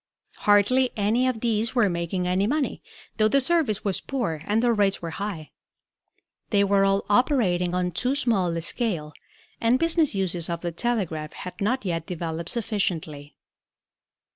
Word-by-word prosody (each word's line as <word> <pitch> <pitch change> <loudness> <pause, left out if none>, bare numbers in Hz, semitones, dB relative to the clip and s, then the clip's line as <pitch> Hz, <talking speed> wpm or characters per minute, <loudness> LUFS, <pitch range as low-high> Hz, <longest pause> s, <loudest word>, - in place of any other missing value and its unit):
Hardly 210 +6 +3
any 220 +5 +2
of 240 -4 -2
these 225 0 0
were 240 -4 +4
making 175 +1 -2
any 185 +3 +1
money, 285 +2 -1 0.4
though 215 -1 +4
the 275 +6 +3
service 270 - +1
was 195 -2 -1
poor 230 - -3
and 220 +3 +1
the 240 -1 +3
rates 200 -3 +2
were 165 -1 -5
high. 185 -4 -5 1.0
They 200 -2 +3
were 200 0 +3
all 195 0 +2
operating 205 - +2
on 180 0 0
too 250 - -1
small 225 -10 +1
a - - -2
scale 170 -7 -2 0.5
and 230 +2 +3
business 325 -4 +2
uses 175 -3 -1
of 170 0 -3
the 175 - -3
telegraph 170 -7 -2
had 180 +1 -9
not 235 +4 0
yet 165 -3 -2
developed 165 -1 -4
sufficiently. 175 -10 -3
200 Hz, 160 wpm, -25 LUFS, 175-235 Hz, 1.0 s, were